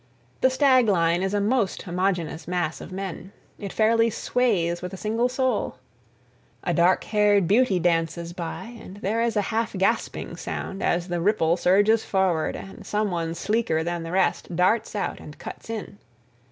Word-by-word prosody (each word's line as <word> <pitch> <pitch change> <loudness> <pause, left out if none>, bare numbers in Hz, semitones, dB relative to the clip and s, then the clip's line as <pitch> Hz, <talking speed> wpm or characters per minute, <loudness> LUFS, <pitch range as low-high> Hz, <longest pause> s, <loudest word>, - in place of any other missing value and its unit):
The 260 - +5
stag 260 -2 +4
line 170 -3 +2
is 195 +2 -1
a - - +2
most 210 -1 0
homogeneous 175 -3 -2
mass 175 -3 -2
of - - -9
men. 190 0 -6 0.3
It 200 -2 -5
fairly 230 +1 +3
sways 200 -7 0
with 180 +1 -6
a - - -5
single 225 +5 0
soul. 260 0 -1 0.9
A 175 - 0
dark 175 +3 +3
haired 205 -3 +3
beauty 210 0 +3
dances 170 0 0
by 185 +7 -6
and 190 -1 -11
there 210 +3 -1
is 230 -1 0
a - - +4
half 225 0 0
gasping 190 -1 -1
sound 195 - -5
as 175 +1 0
the 175 -1 -1
ripple 170 -4 +2
surges 205 +5 +3
forward 185 -5 0
and 195 +2 -9
some 210 0 -1
one 165 -1 -2
sleeker 205 -4 0
than 175 0 -2
the 165 0 -6
rest 185 -1 0
darts 195 +6 +2
out 200 - -2
and 150 - -11
cuts - - -9
in. 215 -2 -6
195 Hz, 170 wpm, -25 LUFS, 175-220 Hz, 0.9 s, The